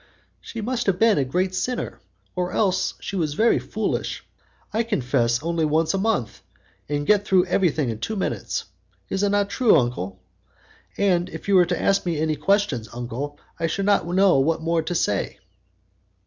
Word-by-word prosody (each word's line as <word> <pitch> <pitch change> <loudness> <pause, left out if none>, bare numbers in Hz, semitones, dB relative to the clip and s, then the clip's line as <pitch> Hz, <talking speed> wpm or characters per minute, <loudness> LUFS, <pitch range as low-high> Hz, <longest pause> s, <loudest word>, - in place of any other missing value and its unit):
"She 230 - -7
must 240 +1 -2
have 190 -2 +2
been 220 -5 +4
a - - +2
great 180 +8 -1
sinner, 245 +7 -3 0.3
or 180 0 -2
else 190 -3 +1
she 200 - -6
was 155 -5 -1
very 230 +6 +3
foolish. - - -3 0.5
I 220 - +2
confess 130 - 0
only 165 0 0
once 155 +1 +2
a 195 - 0
month, 190 - -1 0.5
and 145 0 -1
get 205 +2 +4
through 190 -3 +3
everything 165 -8 +1
in 110 - -6
two 220 - -3
minutes. 120 - -2 0.4
Is 195 - -1
it 205 - +2
not 205 0 +1
true, 240 +2 +4
uncle? 100 -8 -2 0.8
and 185 -3 +2
if - - -9
you 200 - +2
were 180 -2 +6
to 175 - -1
ask 195 - +2
me 170 -3 -1
any 155 0 0
questions, 195 - 0
uncle, 125 +5 -5 0.2
I 165 - +1
should 195 +5 -2
not 200 -4 +2
know 185 -3 +4
what 160 +4 +1
more 165 0 +1
to 175 +3 -4
say." 100 - 0
175 Hz, 180 wpm, -23 LUFS, 145-200 Hz, 0.8 s, were